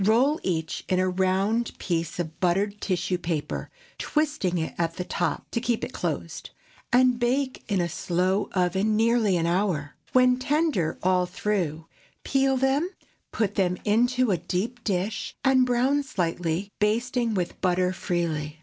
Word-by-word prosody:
Roll 250 +9 +3
each 160 -3 -2
in 185 - +2
a 185 - +2
round 190 +5 0
piece 165 -2 -2
of 160 -3 -4
buttered 200 +3 +1
tissue 180 -1 -1
paper, 160 -4 -3 0.3
twisting 295 - 0
it 160 -1 -2
at 165 -1 -1
the 180 - -3
top - - -2
to 235 - -1
keep 240 -2 0
it - - -4
closed, - - -4 0.4
and 250 -1 +4
bake 255 +2 0
in 200 -3 +1
a 175 - +1
slow 180 +4 0
oven 190 +4 +1
nearly 225 -4 +3
an 165 - 0
hour. 170 -5 0 0.2
When 255 0 +4
tender 280 - +1
all 180 0 +3
through, 175 -5 -2 0.4
peel 270 -1 +2
them, 270 +6 +1 0.4
put 210 -3 0
them 180 -3 +1
into 245 +2 +3
a 185 - +2
deep 195 +8 -3
dish, 200 +1 -2
and 260 -1 +5
brown 255 +4 +2
slightly, 180 - -2
basting 235 +2 +1
with 180 -2 -3
butter 180 0 +2
freely. 165 -5 -2
195 Hz, 150 wpm, -26 LUFS, 175-245 Hz, 0.4 s, and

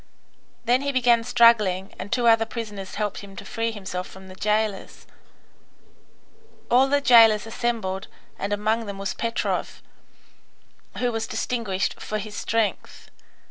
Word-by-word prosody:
Then 245 +2 +3
he 280 0 -1
began 240 -3 +3
struggling, 225 -6 +3
and 190 - -7
two 245 -1 +1
other 225 -1 +5
prisoners 210 -5 -7
helped 210 -1 -2
him 200 -1 -11
to - - -9
free 230 0 -2
himself 190 -4 -5
from 190 0 -13
the 185 - -11
jailers. 210 -1 -2 1.7
All 255 +3 +5
the 285 +1 +2
jailers 225 -5 +6
assembled, 225 -5 -3 0.3
and 200 - -3
among 215 +2 0
them 200 -1 -6
was 195 0 -3
Petrov, 230 +1 -3 1.1
who 245 -1 0
was 225 -1 -3
distinguished 210 -6 -2
for 215 - -3
his 210 0 -7
strength. 225 -1 -2
220 Hz, 140 wpm, -24 LUFS, 200-235 Hz, 1.7 s, jailers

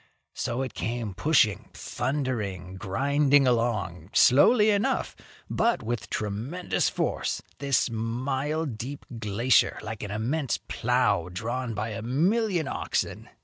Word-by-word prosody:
So 120 +3 -2
it 130 - -5
came 115 -3 -3
pushing, 110 - +2
thundering, 110 - -3
grinding 140 +8 +2
along 110 -8 0
slowly 210 - +6
enough, 210 +7 0 0.3
but 230 - +1
with 120 +1 -3
tremendous 110 - -1
force, - - -2 0.2
this 140 -2 +2
mile 130 +7 -2
deep 135 +2 -6
glacier, 110 +3 +2
like 110 0 -6
an 105 - -5
immense 120 +7 -1
plow 110 -8 0
drawn 115 +4 -3
by 105 +2 -2
a 110 +1 -5
million 175 - +1
oxen. - - -2
120 Hz, 115 wpm, -27 LUFS, 110-145 Hz, 0.3 s, slowly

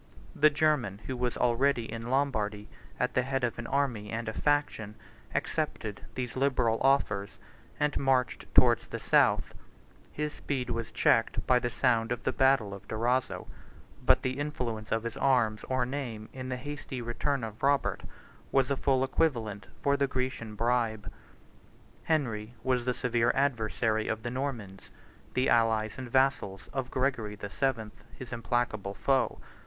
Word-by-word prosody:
The 155 +1 +6
German, 145 -9 +1
82 - - -14
who 130 - -2
was 125 -1 -1
already 125 0 +2
in 115 +1 -5
Lombardy 110 -6 0 0.3
at 125 - 0
the 125 - +3
head 135 +1 -2
of 120 -1 -1
an 120 - -5
army 130 -7 0
and 115 +1 -3
a 110 - -2
faction, 145 -8 0 0.4
accepted - - -2
these 125 -2 -3
liberal 130 -4 +2
offers, 105 -7 +2 0.4
and 150 -1 +1
marched 130 -2 +1
towards - - +5
the - - -5
south: - - +3 0.6
his 150 0 -3
speed 130 -4 -3
was 115 -1 -3
checked - - +2
by 125 -1 +4
the 120 - -1
sound 120 -2 +1
of 120 -1 -2
the 130 - 0
battle 130 -7 +3
of 100 - -10
Durazzo; 125 +4 0 0.6
but - - +4
the 130 +2 -1
influence 120 -7 -3
of 115 0 +1
his 115 - -4
arms, 120 -6 +2
or 130 -1 +1
name, 120 -5 -5
in 130 -1 -6
the 125 - -2
hasty 145 -1 -6
return 120 +3 -1
of 110 -1 -6
Robert, 140 0 +2 0.5
was 135 0 +3
a - - +3
full 130 -1 +2
equivalent 115 -9 0 0.2
for 140 0 +3
the 140 0 +1
Grecian 125 -4 -3
bribe. 115 -1 0 0.9
Henry 120 -7 -1
was 125 -2 +1
the 125 -1 0
severe 120 -1 +2
adversary 115 -4 +1
of 110 -1 -2
the 120 - -3
Normans, 120 -8 -4 0.5
the 130 - +2
allies 110 -1 +2
and 130 -2 -6
vassals 130 -7 +1
of 130 -2 -2
Gregory 125 -6 -1
the 100 -1 -7
Seventh, 115 -5 -2
his 125 -1 -8
implacable 115 -4 -1
foe. 130 -2 +1
125 Hz, 160 wpm, -30 LUFS, 110-135 Hz, 0.9 s, The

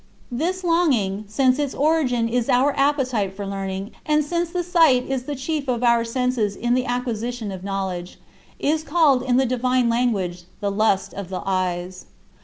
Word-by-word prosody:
This 350 +9 -2
longing 255 - +1
since 255 +5 +2
its 285 -2 -1
origin 275 -6 +2
is 240 0 -1
our 270 +3 +3
appetite 255 -9 +1
for 200 0 -5
learning, 195 +1 -4
and 300 -1 +2
since 340 +2 -1
the 355 +1 -2
sight 325 -8 +4
is 265 -2 -3
the 290 - -3
chief 280 +2 -3
of 250 -1 -1
our 235 -1 +4
senses 230 -3 -1
in 240 +3 0
the 255 0 +1
acquisition 240 -2 -3
of 190 -1 -7
knowledge 190 -3 -4 0.4
is 310 +2 0
called 310 -5 +3
in 250 -1 +1
the 265 - +3
divine 250 0 +1
language 200 -8 0
"the 205 -1 -1
lust 200 -1 +1
of 195 -2 -6
the 185 - -4
eyes." 185 -1 -2
245 Hz, 175 wpm, -22 LUFS, 200-280 Hz, 0.4 s, sight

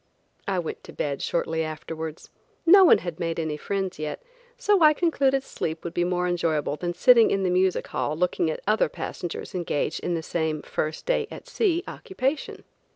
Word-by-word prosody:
I 195 -2 0
went 170 -3 -4
to - - -11
bed 140 -2 -2
shortly 160 -1 -1
afterwards. 160 0 -6 0.3
No 385 +3 +8
one 355 - +7
had 175 -1 -6
made 165 -1 -2
any 160 -2 -2
friends 190 +2 -3
yet, 155 -1 -4 0.4
so 415 -6 +3
I 305 -1 +7
concluded 275 -5 +2
sleep 160 -9 -4
would 170 - -5
be 175 - +1
more 180 0 0
enjoyable 160 -4 0
than 175 +2 -4
sitting 240 0 +6
in 195 -1 0
the 185 - +1
music 185 0 +2
hall 150 - -2
looking 175 -1 +1
at 155 - -4
other 215 -5 +2
passengers 175 +3 -6
engaged 165 -4 -1
in 175 - -2
the 165 - -3
same 160 -2 -2
first 155 0 -3
day - - +1
at - - -10
sea 355 -5 +1
occupation. 280 -5 -3
175 Hz, 185 wpm, -25 LUFS, 160-250 Hz, 0.4 s, No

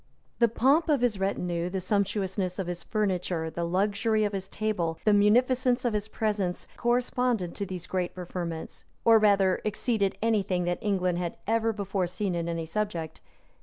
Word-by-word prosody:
The 235 - +6
pomp 275 +8 +3
of 290 -5 +3
his 230 -5 +1
retinue, 180 -3 -1
the 190 +1 -2
sumptuousness 190 -1 -1
of 190 - -2
his 175 0 -4
furniture, 180 -6 -1
the 170 +2 -3
luxury 205 +5 +1
of 205 0 -1
his 190 -1 -3
table, 180 -7 -1
the 210 - +5
munificence 245 +4 +3
of 240 - +1
his 210 0 -1
presents, 210 -5 -2
corresponded 240 -5 0
to 200 - -4
these 180 -2 -6
great 180 -2 -2
preferments; 175 -2 -6 0.2
or 225 -1 +7
rather 200 -3 +3
exceeded 215 -1 0
any 225 -2 +2
thing 180 -2 -1
that 175 0 -1
England 185 -5 0
had 175 -1 -3
ever 225 +1 +2
before 200 -3 -2
seen 190 +1 -2
in 170 -1 -2
any 165 -1 -2
subject. 170 -3 -3
200 Hz, 170 wpm, -28 LUFS, 180-220 Hz, 0.2 s, or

